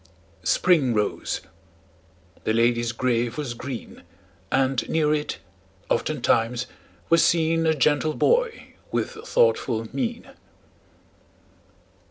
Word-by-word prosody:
Spring 145 -10 +3
rose; 105 -1 -1 1.0
the 110 - 0
lady's 120 0 +2
grave 120 0 -1
was 145 -5 -3
green; 120 0 -7 0.5
And 130 -1 +1
near 155 -2 +2
it, 150 -1 -2 0.5
oftentimes, 120 +2 +1 0.4
was 165 0 +5
seen 165 0 +2
A 160 - +3
gentle 150 +2 +2
boy 480 -1 +1 0.2
with - - -1
thoughtful 440 - +1
mien. 240 -2 -3
145 Hz, 95 wpm, -24 LUFS, 120-165 Hz, 1.0 s, was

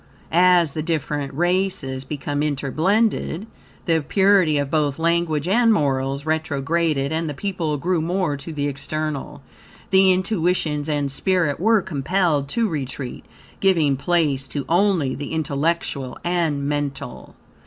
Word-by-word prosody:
As 175 -2 +4
the 155 - -3
different 150 -3 -2
races 175 -6 -1
became 145 0 -3
interblended, 160 - 0 0.4
the 165 -2 +2
purity 190 -1 +3
of 140 -1 -1
both 150 -3 +1
language 165 -2 0
and 230 +4 +4
morals 140 -5 0
retrograded, 155 -1 0
and 160 0 -1
the 145 - -5
people 170 -4 -2
grew 170 +3 0
more 175 -2 0
to 140 +4 -8
the 145 -2 -2
external. 145 0 -4 0.5
The 190 0 +6
intuitions 180 -5 0
and 145 -2 -1
spirit 170 -1 0
were 220 +2 +3
compelled 155 -2 0
to 230 +7 +1
retreat, 135 -6 -5 0.3
giving 165 -8 +3
place 140 -3 0
to 140 +1 -4
only 175 -6 +2
the 145 +2 -6
intellectual 150 -3 -1
and 165 -5 0
mental. 145 - -4
155 Hz, 130 wpm, -22 LUFS, 140-180 Hz, 0.5 s, The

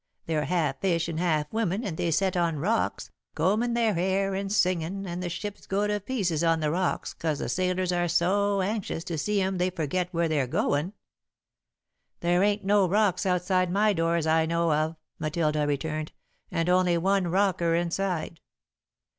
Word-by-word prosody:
They're 155 -2 -1
half 155 -7 -1
fish 170 -3 +1
and 160 -1 -3
half 155 -3 0
woman 220 -1 0
and 190 -8 -3
they 170 - -1
set 185 +3 +1
on 170 -3 +1
rocks, 210 +10 -1 0.2
combin' 215 +9 +1
their 230 -3 +2
hair 190 +2 0
and 195 +1 -3
singin' 185 -1 0
and 175 -1 -4
the 175 - -3
ships 205 +4 -6
go 200 +2 0
to 210 0 0
pieces 190 -8 -1
on 165 -1 +3
the 155 -1 0
rocks 180 +2 -1
'cause 155 -3 -2
the - - -3
sailors 185 0 0
are 175 0 +1
so 195 +4 +2
anxious 200 -4 -3
to 170 -2 -4
see 210 +5 0
'em 190 -1 -1
they 180 +1 +2
forget 180 +1 -2
where 170 -1 +1
they're 145 -5 0
goin'." 145 +8 0 1.3
"There 175 +1 +2
ain't 205 0 +1
no 200 -1 +4
rocks 205 0 +2
outside 180 0 +1
my 210 +2 +3
door 165 -1 +1
as 165 -2 0
I 160 0 +3
know 170 -1 +1
of," 155 +2 0 0.2
Matilda 155 -1 0
returned, 155 +2 -2 0.4
"and 165 0 -1
only 180 -1 +3
one 190 +1 +1
rocker 175 -2 +1
inside." 170 -1 -2
180 Hz, 180 wpm, -27 LUFS, 165-195 Hz, 1.3 s, no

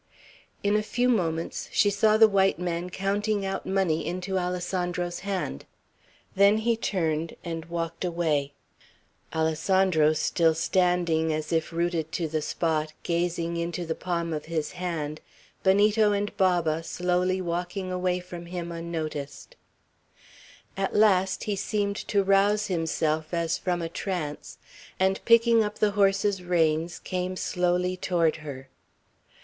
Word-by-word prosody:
In 205 +1 +2
a 210 - +3
few 245 +3 0
moments 165 -9 -1
she 205 -2 +3
saw 215 +1 +3
the 220 0 +8
white 195 -2 +2
man 175 0 -3
counting 200 +2 -1
out 195 - -3
money 190 -5 +1
into 185 +1 -2
Alessandro's 180 -1 -2
hand; 185 - -3 0.7
then 200 +2 +5
he 230 +1 +1
turned 165 -7 -1
and 165 -2 -5
walked 165 0 -4
away, 160 -5 0 0.8
Alessandro 160 0 +2
still 160 +1 +2
standing 170 -2 +1
as 155 +1 -2
if 160 0 0
rooted 170 -1 -1
to 165 - -1
the 155 0 -2
spot, 155 0 -1
gazing 170 0 -1
into 170 +1 -3
the 160 - -1
palm 170 -1 -2
of 150 -1 -4
his 160 -2 -2
hand, 165 -4 -4 0.4
Benito 205 +2 +4
and 205 0 -2
Baba 175 -4 +2
slowly 180 +2 0
walking 180 +2 -3
away 180 0 0
from 175 -1 -9
him 175 -1 -5
unnoticed; 165 - -5 1.2
at 195 0 -2
last 190 -3 +3
he 210 - -1
seemed 200 0 -1
to 200 -1 +2
rouse 200 +2 +3
himself 160 -2 -1
as 170 -1 0
from 175 -2 -1
a - - -1
trance, 165 -3 -4 0.4
and 190 +1 +1
picking 230 -1 +5
up 210 0 -4
the 210 -1 +2
horses' 195 -1 +2
reins, 165 -1 +1
came 185 0 -3
slowly 180 0 0
toward 170 -3 +1
her. 140 -4 -8
180 Hz, 135 wpm, -26 LUFS, 165-195 Hz, 1.2 s, the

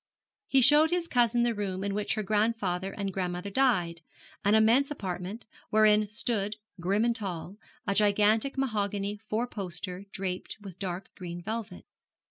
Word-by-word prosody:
He 270 - +4
showed 295 +5 +7
his 350 0 0
cousin 240 -3 +3
the 240 -1 +2
room 195 -3 -3
in 200 0 -1
which 210 +1 -1
her 215 - -2
grandfather 205 -3 0
and 195 -2 -4
grandmother 180 +1 -3
died 185 -10 +2 0.4
an 205 +2 +4
immense 230 +6 +4
apartment, 195 -4 -5 0.2
wherein 215 -1 +4
stood, 210 -1 -1 0.2
grim 200 +6 +1
and 235 -1 +1
tall, 190 -2 -5 0.3
a 200 - +1
gigantic 210 +5 +3
mahogany 205 -5 -1
four 225 +3 0
poster, 185 -3 -5
draped 185 -2 -4
with 195 -4 -11
dark 185 -1 -4
green 175 -2 -7
velvet. 215 -2 -5
205 Hz, 150 wpm, -29 LUFS, 190-225 Hz, 0.4 s, showed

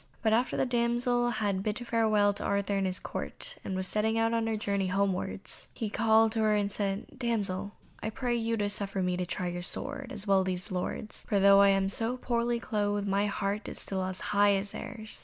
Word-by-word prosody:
But 220 -1 +3
after 240 +3 +1
the - - +2
damsel 240 0 +2
had 205 -5 -1
bid 215 +4 -3
farewell 215 -3 +3
to - - -6
Arthur 200 0 0
and 195 -1 +1
his 185 0 -3
Court, - - -4
and 190 - -3
was 185 0 -1
setting 220 +3 +1
out 225 0 +2
on 230 -1 0
her 220 -1 0
journey 200 -2 -1
homewards, 195 0 -1
he 220 -4 -3
called 220 0 +4
to 225 - -2
her 215 -1 +3
and 205 -1 0
said, 195 0 -2
"Damsel, 205 -5 -2 0.3
I 220 - -2
pray 240 +2 -2
you 230 0 -1
to 205 -1 0
suffer 200 -2 0
me 180 0 0
to 180 0 -3
try 180 0 -2
your 175 0 -4
sword, 275 +7 -1
as 210 -5 -4
well 195 -2 +4
as 190 - 0
these 185 +2 -2
lords, 185 +3 -2
for 200 - +3
though 200 0 +7
I 200 - +7
am 195 0 +2
so 225 +5 0
poorly 235 -1 0
clothed, 205 -3 -1
my 200 +1 +1
heart 200 +1 -2
is - - -3
as 185 -1 -2
high 205 -1 +3
as 195 +1 -3
theirs." 220 -3 -5
205 Hz, 220 wpm, -29 LUFS, 195-225 Hz, 0.3 s, though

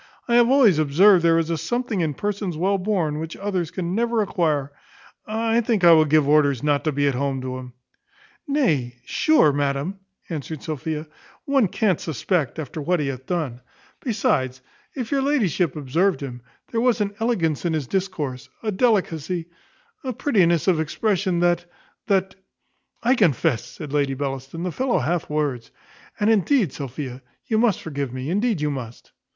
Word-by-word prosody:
I 235 - 0
have 240 0 +5
always 245 - +5
observed 170 +5 +5
there 165 -1 +4
is 165 0 0
a 165 - -1
something 240 -3 -2
in 155 -4 -1
persons 200 -3 -3
well 195 +4 +1
born, 180 -7 -1
which 160 +1 -6
others 190 -5 -2
can 180 0 -3
never 230 +1 +1
acquire. 155 -7 0 0.6
I 225 +2 +1
think 220 -4 0
I 170 - +8
will 160 -1 +6
give 150 -1 +3
orders 145 -3 +3
not 145 -1 +1
to 155 - +2
be 145 0 +1
at 140 - +2
home 135 +1 -1
to 130 0 -4
him." 125 -1 -10 0.7
"Nay, 155 - +1
sure, 310 - +3
madam," 145 +6 -1 0.3
answered 155 -2 -6
Sophia, 155 +1 -4 0.4
"one 275 -7 +3
can't 190 -1 0
suspect 160 - -1
after 155 0 -5
what 175 +4 +1
he 145 -2 -1
hath 130 -1 -7
done; 145 -9 -2 0.4
besides, 140 - 0 0.4
if 250 -5 -4
your 275 -1 +2
ladyship 205 - +1
observed 160 +7 0
him, 125 -3 -6 0.3
there 230 - 0
was 240 -2 +2
an 205 -1 -1
elegance 180 - 0
in 170 -2 0
his 155 -3 -1
discourse, 155 -7 -3
a 215 - 0
delicacy, 180 - 0 0.5
a 260 -2 -3
prettiness 185 - +2
of 180 -4 +3
expression 185 +2 0
that, 175 0 +2 0.4
that 190 -2 +1 0.4
" - - -41
"I 245 +2 +4
confess," 165 - +2
said 150 -3 -9
Lady 140 -2 +1
Bellaston, 135 +3 -4
"the 180 - -2
fellow 255 +6 0
hath 160 +4 -1
words 145 -6 -2 0.5
And 210 - +2
indeed, 215 - +2
Sophia, 130 -2 -6 0.2
you 220 - +1
must 225 -5 +2
forgive 140 -5 -4
me, 130 +4 -4
indeed 205 -2 0
you 150 0 0
must." 125 -4 -8
165 Hz, 170 wpm, -23 LUFS, 145-205 Hz, 0.7 s, I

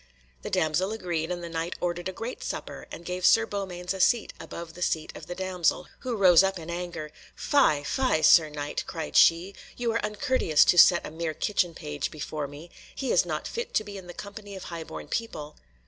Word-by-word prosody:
The - - -5
damsel 160 +6 +1
agreed, 175 -7 -2
and 175 -1 -4
the - - -4
Knight 165 +1 -3
ordered 175 +1 -2
a - - -3
great 225 +6 -6
supper, - - -6
and 170 - -9
gave 180 +1 -4
Sir 225 +4 +6
Beaumains 190 -3 -4
a 190 - -6
seat 235 +4 +3
above 170 -1 -8
the 180 - -11
seat 160 -3 -1
of - - -10
the 175 - -5
damsel, 185 -2 0
who 250 -2 -3
rose 185 -5 +7
up 195 0 0
in 165 0 -7
anger. 170 -3 -5 0.2
"Fie! 155 - +3
fie! 255 - +1
Sir 155 0 +7
Knight," 145 -1 -4
cried 160 -3 -5
she, 170 +4 +5 0.2
"you 240 -1 0
are 230 - -1
uncourteous 210 - +2
to 175 - +4
set 175 - +7
a - - -7
mere 160 0 -3
kitchen 175 -3 0
page 150 -3 -4
before 150 -1 -5
me; 145 +5 -12 0.2
he 265 -3 -2
is 175 - +3
not 155 -2 -3
fit 470 +1 -5
to 215 - +3
be 205 -1 -9
in 190 -2 -9
the 175 - -9
company 205 0 -9
of 190 - -8
highborn 165 -2 -7
people." 155 -10 -4
175 Hz, 210 wpm, -27 LUFS, 160-200 Hz, 0.2 s, rose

